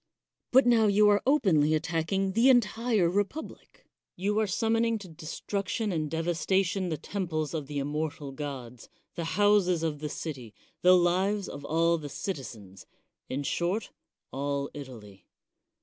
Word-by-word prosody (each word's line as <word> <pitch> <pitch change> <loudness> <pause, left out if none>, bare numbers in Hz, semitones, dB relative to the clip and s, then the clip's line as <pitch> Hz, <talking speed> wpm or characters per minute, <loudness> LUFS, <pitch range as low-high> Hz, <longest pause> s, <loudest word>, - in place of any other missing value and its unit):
But 260 +1 +6
now 230 -3 +5
you 210 +1 +5
are 205 0 +4
openly 160 - +3
attack 165 0 -2
ing 195 0 +1
the 230 +6 +4
entire 230 -5 +3
republic. 205 - -4 0.3
You 205 +4 0
are 215 - +1
summoning 225 +3 +1
to 200 -3 -10
destruction 195 +6 -3
and 155 -3 -2
devas 165 +1 -2
tation 190 -1 +1
the 160 - -2
temples 160 -3 -3
of 150 -4 -4
the 145 0 -5
immortal 145 +1 -3
gods, 130 -4 -7 0.2
the 170 -2 -4
houses 205 -5 +3
of 155 -3 -2
the 150 0 -4
city, 130 -9 -6 0.3
the 180 +1 +7
lives 190 +3 +1
of 145 - -8
all 165 +2 +2
the 145 -2 -7
citizens 120 - -7 0.2
— - - -52
in 140 +2 -2
short, 180 +8 -1 0.4
all 140 +1 -2
Italy. 115 -9 -11
170 Hz, 150 wpm, -28 LUFS, 145-205 Hz, 0.4 s, the